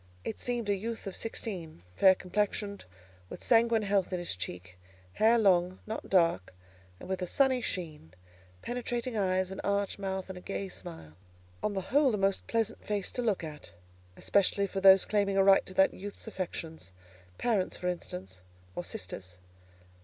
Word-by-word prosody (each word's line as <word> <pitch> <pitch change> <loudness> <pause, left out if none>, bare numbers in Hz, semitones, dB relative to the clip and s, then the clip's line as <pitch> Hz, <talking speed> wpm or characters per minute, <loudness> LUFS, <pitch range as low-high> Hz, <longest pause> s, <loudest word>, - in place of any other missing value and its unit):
It 220 - -4
seemed 240 -3 -2
a 205 - +3
youth 225 +4 -5
of 195 - -5
sixteen, 180 - -4
fair 190 -1 +7
complexioned, 200 +2 -2 0.4
with - - -8
sanguine 230 -1 +4
health 200 -2 +1
in 180 - 0
his 175 - -3
cheek; 90 0 -7 0.3
hair 225 - +5
long, 185 -4 +3
not 220 +1 -5
dark, 165 - +2 0.4
and - - -10
with 190 0 -2
a 180 - -1
sunny 260 +3 +3
sheen; 155 - -5 0.5
penetrating 245 0 -3
eyes, 185 -2 +1
an 190 - -6
arch 200 0 0
mouth, 190 -1 -3
and 190 -1 -7
a - - -15
gay 195 +1 -4
smile. 165 - -9 0.5
On 205 - -1
the 190 -1 -4
whole 280 -5 +5
a - - -2
most 195 0 0
pleasant 225 -1 -1
face 205 -3 -2
to 250 - -2
look 215 -7 0
at, 150 - -8 0.4
especially 200 0 +2
for, 195 0 -4
those 190 0 +8
claiming 200 -2 +1
a 195 - +6
right 195 0 +6
to 185 - -6
that 190 - +5
youth's 200 +2 -7
affections—parents, 160 - -4
for 180 - -3
instance, 95 - -5 0.3
or 175 - -3
sisters. 95 - -6
195 Hz, 170 wpm, -30 LUFS, 175-210 Hz, 0.5 s, those